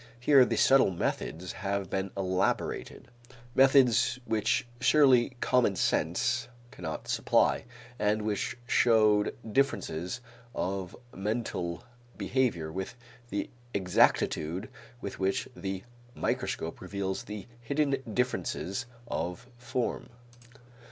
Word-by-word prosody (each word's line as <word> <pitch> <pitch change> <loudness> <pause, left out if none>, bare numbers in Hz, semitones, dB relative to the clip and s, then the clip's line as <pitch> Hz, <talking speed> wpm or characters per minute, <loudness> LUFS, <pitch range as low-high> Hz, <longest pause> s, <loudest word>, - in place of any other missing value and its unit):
Here 130 0 +6
subtle 135 -5 +6
methods 90 -1 -3
have 100 -1 -3
been 95 0 -1
elaborated, 95 0 -1 0.4
methods 130 -3 +5
which 110 +2 +1
surely 130 -2 +4
common 120 -6 +3
sense - - +1 0.2
cannot 80 -3 -6
supply, - - +2 0.3
and 105 +1 +1
which 105 +2 -2
showed 110 -4 +4 0.2
differences 120 - 0 0.4
of 95 -1 -3 0.2
mental 95 -4 -3 0.3
behavior 110 -12 0
with 95 +6 -5 0.3
the 100 - -3 0.2
exactitude 90 -1 +2 0.3
with 100 - -6
which 95 0 0
the 95 -3 -4 0.3
microscope 80 - -2
reveals 95 +1 -3
the 105 -1 -7 0.2
hidden 140 +3 +1
differences 125 -2 -1 0.2
of 90 +8 -3
form. 120 0 -2
105 Hz, 95 wpm, -29 LUFS, 95-125 Hz, 0.4 s, Here